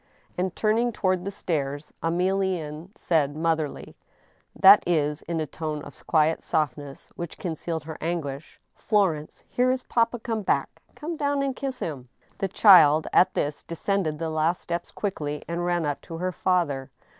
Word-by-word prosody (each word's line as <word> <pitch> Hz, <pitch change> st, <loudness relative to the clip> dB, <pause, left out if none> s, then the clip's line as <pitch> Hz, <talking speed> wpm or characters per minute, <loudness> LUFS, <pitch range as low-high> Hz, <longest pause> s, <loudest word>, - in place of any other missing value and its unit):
And 180 Hz, 0 st, -2 dB
turning 225 Hz, +3 st, +2 dB
toward 185 Hz, -4 st, 0 dB
the -, -, -1 dB
stairs, 150 Hz, -6 st, -3 dB
Emilienne 175 Hz, -2 st, -1 dB
said, 150 Hz, -4 st, +1 dB
motherly 160 Hz, -2 st, -2 dB, 0.6 s
^that 195 Hz, +2 st, +9 dB
is, 150 Hz, -3 st, +1 dB
in 170 Hz, -1 st, -3 dB
a 155 Hz, -, -1 dB
tone 150 Hz, -1 st, -5 dB
of -, -, -14 dB
quiet 160 Hz, 0 st, +2 dB
softness, 145 Hz, -3 st, -3 dB
which 170 Hz, -2 st, -6 dB
concealed 165 Hz, -2 st, -4 dB
her 160 Hz, 0 st, -8 dB
anguish: 155 Hz, -4 st, -4 dB
" -, -, -50 dB
Florence, 185 Hz, -8 st, 0 dB
here 250 Hz, +1 st, +1 dB
is 255 Hz, 0 st, 0 dB
papa 230 Hz, 0 st, +1 dB
come 225 Hz, -1 st, -3 dB
back! -, -, -1 dB
Come 325 Hz, +2 st, -5 dB
down 285 Hz, -2 st, 0 dB
and 270 Hz, -2 st, -1 dB
kiss 270 Hz, -1 st, -4 dB
him," 135 Hz, -6 st, -5 dB, 0.3 s
The 195 Hz, -, 0 dB
child, 175 Hz, -6 st, +7 dB
at 185 Hz, +1 st, +4 dB
this, 145 Hz, 0 st, -1 dB
descended 170 Hz, -2 st, -1 dB
the 160 Hz, 0 st, -3 dB
last 160 Hz, +3 st, +1 dB
steps 170 Hz, 0 st, -4 dB
quickly 150 Hz, -8 st, -4 dB
and 170 Hz, +1 st, -2 dB
ran 175 Hz, -2 st, +1 dB
up 145 Hz, -1 st, -2 dB
to 165 Hz, -, -8 dB
her 185 Hz, +2 st, -1 dB
father. 170 Hz, -8 st, 0 dB
170 Hz, 165 wpm, -25 LUFS, 150-195 Hz, 0.6 s, ^that